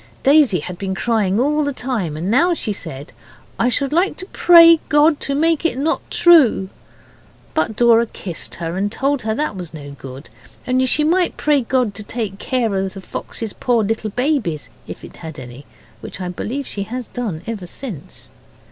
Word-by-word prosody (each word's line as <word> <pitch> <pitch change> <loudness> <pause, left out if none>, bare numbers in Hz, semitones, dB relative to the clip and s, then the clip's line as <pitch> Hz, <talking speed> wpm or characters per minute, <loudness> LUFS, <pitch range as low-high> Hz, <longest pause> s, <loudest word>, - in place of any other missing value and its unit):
Daisy 275 - +4
had 180 +3 -8
been 190 -1 -3
crying 205 0 +1
all 300 +4 +2
the 285 - -1
time, 220 - -3
and 175 +6 -2
now 340 +8 +3
she 215 -9 -3
said, 140 -4 -9 0.5
'I 240 - +3
should 275 +3 -1
like 355 +4 +1
to 370 - -7
pray 335 -1 +7
God 295 0 +4
to 280 - -2
make 325 +2 +2
it 330 -7 0
not 310 +4 0
true.' 285 - +5 0.8
But 270 -9 0
Dora 235 0 +4
kissed 180 -5 -7
her, 170 +1 -4
and 205 +2 -1
told 275 +3 0
her 220 0 -2
that 300 -4 -2
was 175 -3 -8
no 145 -2 -9
good 135 0 -10 0.4
only 255 +1 +2
she 300 +4 +2
might 350 +3 +1
pray 295 -2 +2
God 245 -3 0
to 215 - -8
take 210 -2 -5
care 245 -5 -1
of 190 0 -2
the - - -6
fox's 220 +3 -6
poor 240 -3 +1
little 220 +1 -2
babies, 240 - -1 0.2
if - - -9
it - - -12
had 160 -2 -8
had - - -7
any, 125 +2 -11 0.3
which - - -9
I 180 -1 -4
believe 240 - -4
she 205 - -5
has 240 +5 -5
done 205 -10 -4
ever 215 -6 -5
since. 200 - -9
230 Hz, 190 wpm, -19 LUFS, 190-285 Hz, 0.8 s, pray